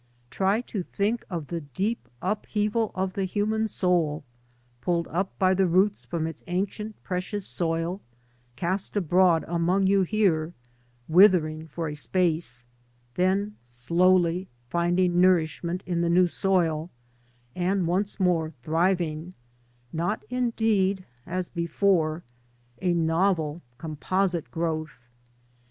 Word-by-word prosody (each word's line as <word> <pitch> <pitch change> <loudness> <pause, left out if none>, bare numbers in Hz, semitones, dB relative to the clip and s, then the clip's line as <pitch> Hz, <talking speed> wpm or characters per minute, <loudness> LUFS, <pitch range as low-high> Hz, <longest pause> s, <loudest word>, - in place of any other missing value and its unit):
Try 195 +4 +1
to 215 -5 -4
think 205 +6 -1
of 170 -5 -4
the 170 -1 -3
deep 170 - -3
upheaval 210 +2 0
of 190 0 -1
the 195 0 -1
human 215 +3 0
soul, 175 -7 +1 0.6
pidled 170 +3 0
up 185 +4 -2
by 185 0 +4
the 190 0 +3
roots 190 +4 +2
from 165 -2 -2
its 160 - -6
ancient, 205 +4 -3
precious 185 +2 -3
soil, 165 +3 -2 0.5
cast 185 - -1
abroad 180 -2 +3
among 175 +3 +1
you 195 0 +4
here, 180 -5 +1 0.5
withering 160 -3 +5
for 165 0 -4
a 150 - -4
space, 155 -6 -1 0.5
then 195 +5 0
slowly 170 +9 +2 0.2
finding 175 +1 +2
nourishment 175 0 +2
in 175 -2 -1
the 170 - +1
new 180 +2 +5
soil, 170 -3 0 0.7
and 185 +1 +1
once 195 +5 -1
more 175 -4 +2
thriving 170 +1 0 0.3
— 120 0 -36
not, 175 +6 -2
indeed, 220 -6 +1 0.2
as 180 0 -2
before 170 -1 +1 0.3
— 120 0 -34
^a 180 -2 +2
novel, 165 -1 +1 0.2
composite 170 +1 -1
growth. 155 -2 -3
180 Hz, 120 wpm, -26 LUFS, 165-195 Hz, 0.7 s, withering